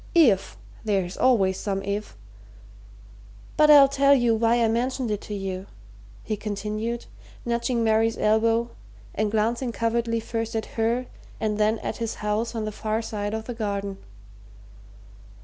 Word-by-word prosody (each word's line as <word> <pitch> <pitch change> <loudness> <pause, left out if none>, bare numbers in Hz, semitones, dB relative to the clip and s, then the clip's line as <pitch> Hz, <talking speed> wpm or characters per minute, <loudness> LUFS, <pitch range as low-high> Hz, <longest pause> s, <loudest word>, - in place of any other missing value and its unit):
If 200 - +4 0.3
there's 195 -4 -1
always 195 -7 +3
some 195 -1 -2
if! 200 - -4 1.4
But 305 0 +5
I'll 285 -2 +9
tell 280 +1 +4
you 240 -3 +3
why 230 +1 +3
I - - +4
mentioned 245 +1 -1
it 210 - -2
to 210 - -6
you," 190 -1 -4 0.6
he 215 - -2
continued, 215 +3 -4 0.4
nudging 235 0 0
Mary's 225 0 +2
elbow 225 +2 +2 0.4
and 215 +1 0
glancing 230 +4 0
covertly 230 0 0
first 225 0 -4
at 220 - -1
her 235 +3 0 0.3
and 215 -1 -1
then 215 +1 +3
at - - -3
his 230 -2 -3
house 215 +3 -2
on 220 -1 -2
the 215 - -3
far 220 +1 -2
side 210 -1 -3
of 220 0 -5
the 245 - -5
garden. 200 -3 -3
225 Hz, 150 wpm, -25 LUFS, 210-235 Hz, 1.4 s, I'll